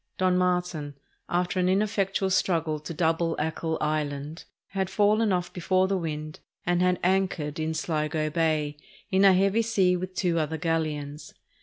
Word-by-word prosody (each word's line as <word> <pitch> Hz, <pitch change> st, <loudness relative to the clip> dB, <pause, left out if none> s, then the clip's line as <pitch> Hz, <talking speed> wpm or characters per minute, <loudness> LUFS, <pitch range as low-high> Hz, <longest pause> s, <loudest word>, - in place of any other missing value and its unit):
Don 185 Hz, -1 st, +2 dB
Martin, 180 Hz, -5 st, 0 dB, 0.3 s
after 180 Hz, +1 st, 0 dB
an 180 Hz, 0 st, +2 dB
ineffectual 195 Hz, -1 st, +1 dB
struggle 165 Hz, -5 st, +1 dB
to 150 Hz, -, -8 dB
double 165 Hz, 0 st, +1 dB
Achill 160 Hz, +1 st, -2 dB
Island, 150 Hz, 0 st, -2 dB, 0.2 s
had 190 Hz, -1 st, -2 dB
fallen 210 Hz, +2 st, +3 dB
off 180 Hz, -1 st, -1 dB
before 185 Hz, +1 st, +1 dB
the 195 Hz, -, 0 dB
wind 155 Hz, -3 st, -4 dB, 0.3 s
and 175 Hz, 0 st, +2 dB
had 180 Hz, 0 st, +3 dB
anchored 180 Hz, -5 st, 0 dB
in 160 Hz, 0 st, -1 dB
Sligo 155 Hz, -1 st, -1 dB
Bay 155 Hz, -2 st, 0 dB, 0.3 s
in 190 Hz, +1 st, +4 dB
a 195 Hz, -1 st, +8 dB
heavy 195 Hz, +4 st, +3 dB
sea 195 Hz, -5 st, +2 dB
with 185 Hz, +1 st, -5 dB
two 175 Hz, -3 st, +1 dB
other 160 Hz, +1 st, -1 dB
galleons. 155 Hz, -2 st, -3 dB
175 Hz, 155 wpm, -27 LUFS, 155-185 Hz, 0.3 s, a